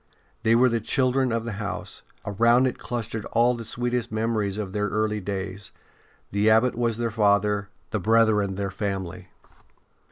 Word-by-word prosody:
They 115 +1 +3
were 125 +2 +5
the 115 -1 +1
children 130 +2 +1
of 115 0 -1
the 115 - -3
house; 105 0 -5 0.2
around 115 +5 +4
it 130 - -2
clustered 115 -2 -4
all 120 +2 +3
the 120 -1 -6
sweetest 120 +1 -2
memories 110 -2 -1
of 100 -3 -4
their 105 0 0
early 105 +1 0
days; 95 0 -5 0.6
the 100 +2 +3
Abbot 110 +3 +4
was 115 -2 0
their 115 -1 -1
father, 105 -1 +2 0.2
the 110 - 0
brethren 105 -1 +3
their 100 0 -3
family. 95 -3 -4
110 Hz, 160 wpm, -25 LUFS, 100-115 Hz, 0.6 s, were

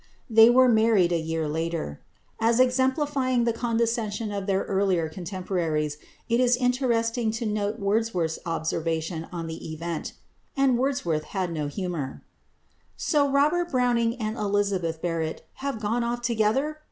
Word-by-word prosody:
They 225 +1 +8
were 255 +1 +6
married 220 -6 +4
a 170 - +2
year 160 -1 -2
later. 160 - -3 0.4
As 230 +2 +3
exemplifying 260 0 +2
the 235 -1 +1
condescension 230 -2 -1
of 200 -1 -4
their 195 -1 +1
earlier 190 -4 +1
contemporaries 165 -4 -2 0.3
it 235 +1 +2
is 250 -1 +4
interesting 245 -2 +1
to 230 +1 -3
note 210 0 -1
Wordsworth's 200 -6 0
observation 165 0 -2
on 170 -2 -4
the 160 0 -6
event 165 +1 -4 0.4
and 270 -2 +4
Wordsworth 175 - 0
had 185 -2 0
no 155 -3 -2
humour 160 -4 -4 0.7
"So, 290 -3 +2
Robert 300 +5 +2
Browning 240 -3 +2
and 220 -2 -3
Elizabeth 200 -6 -1
Barrett 165 -2 -2
have 275 -4 -3
gone 225 +3 0
off 240 +1 -2
together! 240 +7 +1
215 Hz, 140 wpm, -26 LUFS, 170-240 Hz, 0.7 s, They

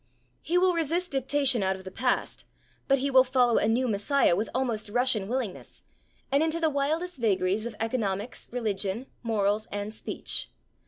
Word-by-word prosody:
He 350 - 0
will 365 0 +4
resist 335 +2 -1
dictation 270 -2 +2
out 190 0 +1
of 190 - -11
the 190 - -8
past, 250 +5 -1 0.4
but 275 - +4
he 275 +1 -1
will 260 -1 +7
follow 250 -2 +3
a - - +1
new 245 +3 +2
messiah 210 0 +2
with 210 +5 -2
almost 235 -5 -2
Russian 245 -3 +1
willingness, 240 -5 -4 0.5
and 280 +2 +3
into 320 +1 0
the 320 -2 +2
wildest 310 +5 -1
vagaries 200 0 +1
of 230 - -8
economics, 220 -1 -3
religion, 215 -1 -2 0.2
morals 215 -2 0
and 205 +1 -4
speech. - - -2
245 Hz, 165 wpm, -27 LUFS, 210-275 Hz, 0.5 s, will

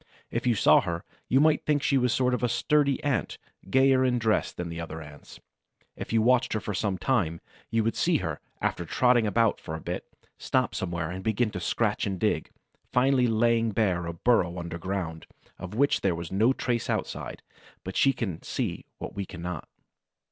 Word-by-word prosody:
If - - -2
you 120 - +3
saw - - +6
her, 85 0 -4 0.3
you 130 - +4
might 155 0 +4
think 145 -2 +1
she 135 - +3
was 125 -1 +2
a - - +1
sort 125 -1 +2
of 125 -1 0
sturdy 140 +3 +2
Ant, 140 -5 -1 0.3
gayer 130 +2 +4
in 125 -1 +2
dress 110 -2 +1
than 85 -1 -6
other 80 -1 -6
Ants. 75 -2 -12 0.6
If - - -7
you 115 -1 +3
watched 125 +1 +3
her 110 - 0
for 105 +1 -4
some 100 -1 -1
time, 90 -7 0 0.3
you 115 -1 +1
would 115 - 0
see - - +2
her, - - -4 0.2
after 90 - -1
trotting 120 +4 +3
about 110 +2 +2
for 80 - -6
a - - -5
bit, - - -5 0.3
stop - - 0
somewhere 85 -2 -3
and 95 +1 -6
begin 110 +1 +1
to 95 - -4
scratch 105 +4 0
and 95 -2 -3
dig, - - 0 0.4
finally 125 0 +3
laying 115 0 +2
bare 95 -5 +1
a 85 - -3
burrow 90 -2 +2
underground, 85 0 -4 0.3
of 90 +3 -7
which 140 +4 +2
there 95 -3 +1
was 85 -1 -6
no 110 +6 +3
trace 120 -3 -1
outside; - - -3 0.4
but - - -6
she 135 - +5
can 95 -11 -4
see - - -3
what - - -7
we 100 - -3
cannot. 90 -4 -6
110 Hz, 190 wpm, -27 LUFS, 90-125 Hz, 0.6 s, saw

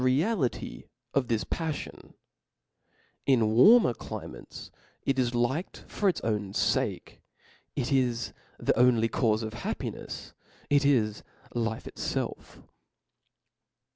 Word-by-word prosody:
reality 135 - 0 0.3
of 135 -3 +1
this 115 -2 0
paf 160 -3 -2
fion. - - -14 1.1
In 115 -5 +4
warmer 205 - +7
climates - - -8 0.3
it 135 -1 +1
is 120 -1 +1
liked 130 +9 -1
for 205 - +1
its 180 - -1
own 105 -3 -1
fake, - - 0 0.5
it 130 -1 -1
is 125 -4 +1 0.2
the - - +1
only 120 -2 +5
caufe 110 -1 +1
of 110 0 -4
happinefs, 120 - -5 0.4
it 145 0 +5
is 115 -7 +2 0.3
life 115 -2 -1
itfelf. - - -4
120 Hz, 110 wpm, -28 LUFS, 115-140 Hz, 1.1 s, warmer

